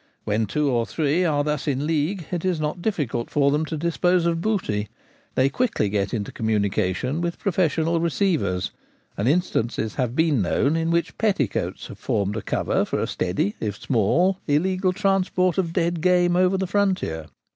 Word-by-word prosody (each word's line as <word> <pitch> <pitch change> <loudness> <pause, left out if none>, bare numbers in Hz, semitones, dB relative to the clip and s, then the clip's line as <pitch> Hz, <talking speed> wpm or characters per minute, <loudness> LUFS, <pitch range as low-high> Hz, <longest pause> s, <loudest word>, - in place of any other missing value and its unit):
When 110 +1 0
two 150 +9 0
or 120 -4 +1
three 160 +3 +1
are 145 -3 +2
thus 150 -1 -2
in 140 0 0
league 160 +3 -1
it 175 -2 -2
is 185 -3 0
not 155 +3 -2
difficult 145 - -2
for 140 -1 +2
them 150 +2 +1
to 155 0 -4
dispose 170 +2 +1
of 165 -1 +1
booty 140 - -1 0.5
they 130 - +4
quickly 205 - 0
get 100 -1 -1
into 105 -4 -3
communication 105 - 0
with 170 0 -2
professional 165 -3 +1
receivers; 165 - 0 0.4
and 105 - -1
instances 120 - 0
have 125 -1 -1
been 160 -6 +2
known 140 - +1
in 165 0 0
which 170 -2 -1
petticoats 190 - 0
have - - -10
formed 100 0 -1
a 110 - -2
cover - - 0
for - - -2
a - - 0
steady 95 +3 -1
if 105 -1 -3
small 170 - +2
illegal 185 +5 +2
transport 185 -2 +1
of 170 -3 0
dead 170 -1 0
game 175 0 +3
over 185 +1 +3
the 190 - -1
frontier. 185 - 0
155 Hz, 175 wpm, -23 LUFS, 115-180 Hz, 0.5 s, they